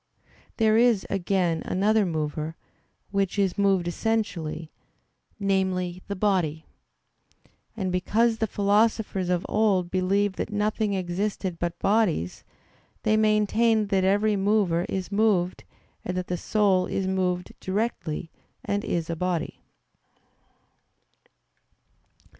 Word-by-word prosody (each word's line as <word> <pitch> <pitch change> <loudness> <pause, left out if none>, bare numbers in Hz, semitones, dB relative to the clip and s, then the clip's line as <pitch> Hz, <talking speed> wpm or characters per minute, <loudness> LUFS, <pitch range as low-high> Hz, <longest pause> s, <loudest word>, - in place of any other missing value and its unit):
There 220 -1 +4
is, 235 -4 +3
again, 180 -3 0
another 210 +2 +2
mover, 155 -1 -3 0.6
which 200 0 0
is 195 -3 +1
moved 195 -3 +2
essentially 175 -6 -2 0.7
namely, 190 -2 0
the 200 - -3
body. 180 -6 0 1.1
And 190 -3 -1
because 225 +5 +1
the 220 - +1
philosophers 205 -2 +1
of 180 -1 0
old 195 -5 +1
believed 190 +2 +1
that - - -3
nothing 210 0 0
existed 185 0 -2
but 175 0 -2
bodies, 195 - +1 0.6
they 215 0 +3
maintained 215 0 +2
that 195 -2 +2
every 205 +2 +3
mover 195 -4 +1
is 190 0 -3
moved; 200 -4 +1 0.4
and 180 0 -3
that 180 - -2
the 180 - -2
soul 190 -1 +2
is 195 - -2
moved 185 -1 -1
directly, 185 -6 -3 0.3
and 205 +1 -1
is 170 -2 -2
a 165 - -2
body. 180 0 -2
195 Hz, 115 wpm, -26 LUFS, 180-210 Hz, 1.1 s, There